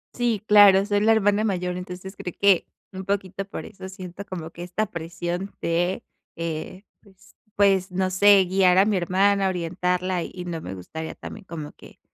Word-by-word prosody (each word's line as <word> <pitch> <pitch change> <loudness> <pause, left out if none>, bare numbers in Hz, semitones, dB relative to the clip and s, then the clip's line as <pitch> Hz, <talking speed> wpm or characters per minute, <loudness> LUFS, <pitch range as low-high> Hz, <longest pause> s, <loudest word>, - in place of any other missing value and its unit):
Sí, 235 -4 0
claro, 200 -2 +7
soy 205 -1 +1
la 225 +1 +4
hermana 205 -1 +3
mayor, 180 -3 -1
entonces, 180 +2 -8
creo 180 - -6
que 200 -3 +4 0.3
un 190 0 -6
poquito 195 0 -2
por 200 - -8
eso 190 -2 -10
siento 185 +1 -8
como 175 -5 -7
que 175 - -9
esta 180 +5 -2
presión 175 +2 -5
de, 175 +2 0 0.3
eh, 165 +4 -5 0.2
pues 190 -3 -22 0.2
pues, 195 -2 +3
no 185 +1 0
sé, 195 0 +6
guiar 185 0 +3
a 195 - +6
mi 210 -2 +1
hermana, 195 +2 +2
orientarla. 180 0 -1
Y 180 -1 -8
no 165 -2 -4
me 95 - -6
gustaría 160 - -7
también 210 - -9
como 155 -4 -7
que, - - -17
185 Hz, 180 wpm, -24 LUFS, 175-200 Hz, 0.3 s, claro